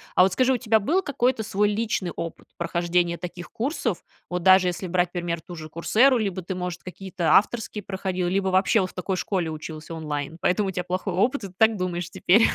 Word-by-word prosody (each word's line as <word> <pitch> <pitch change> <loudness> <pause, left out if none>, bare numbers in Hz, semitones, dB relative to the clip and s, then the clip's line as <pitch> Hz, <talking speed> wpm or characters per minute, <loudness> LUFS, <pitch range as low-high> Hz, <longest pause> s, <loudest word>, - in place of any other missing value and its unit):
А - - +7
вот 190 0 +2
скажи, 255 +6 +3
у 255 - +2
тебя 220 -2 +2
был 335 - +2
какой-то 255 -7 0
свой 210 -1 +1
личный 210 -4 -1
опыт 165 -1 -6
прохождения 170 0 0
таких 175 0 -8
курсов? 235 - -2 0.3
Вот 180 -1 -3
даже 185 0 +6
если 180 +1 -2
брать, 175 0 +1
например, 170 -1 -2
ту 175 +2 -10
же 155 -1 -8
"Курсэру", 235 - +3
либо 195 -4 -2
ты, 185 +2 -5
может, 180 -1 -4
какие-то 185 -2 -2
авторские 215 0 +1
проходил, 185 -2 -2
либо 190 +1 +1
вообще 190 +3 +3
вот 185 - -2
в - - -16
такой 185 +1 -2
школе 180 -3 -1
учился 155 +1 -7
онлайн, 150 -1 -4
поэтому 195 +2 +2
у - - -2
тя 180 -1 -3
плохой 185 +1 -2
опыт, 230 +4 +1
и - - -4
ты 185 - -16
так 220 0 +4
думаешь 180 -1 -3
теперь? 215 +6 +4
185 Hz, 215 wpm, -25 LUFS, 175-210 Hz, 0.3 s, А